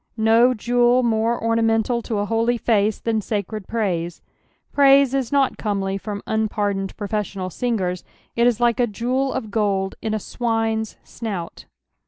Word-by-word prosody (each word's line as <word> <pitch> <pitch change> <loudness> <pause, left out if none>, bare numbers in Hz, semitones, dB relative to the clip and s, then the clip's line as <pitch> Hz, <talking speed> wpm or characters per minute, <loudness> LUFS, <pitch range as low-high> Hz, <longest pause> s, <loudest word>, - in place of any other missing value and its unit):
No 225 +3 +4
jewel 245 +2 +3
more 230 0 +1
ornamental 230 +1 +1
to 225 -1 -3
a 205 - 0
holy 230 +2 +1
face 215 -2 +1
than 225 -2 -1
sacred 210 -1 -4
praise, 175 -7 -2 0.5
praise 275 -1 +5
is 270 -2 -1
not 275 -2 +1
comely 195 -2 -1
from 205 +1 -5
unpardoned 205 -3 -1
profes 210 -1 -3
Monal 185 -1 -4
singers; 185 -6 -2 0.3
it 235 +1 +4
is 240 -2 +1
like 240 0 +2
a 245 - +3
jeweT 250 +5 -1
of 220 -5 -4
gold 200 -3 0
in 220 -1 -1
a - - +1
swiue's 225 -1 -2
snout. 195 -8 -6
220 Hz, 155 wpm, -22 LUFS, 205-240 Hz, 0.5 s, praise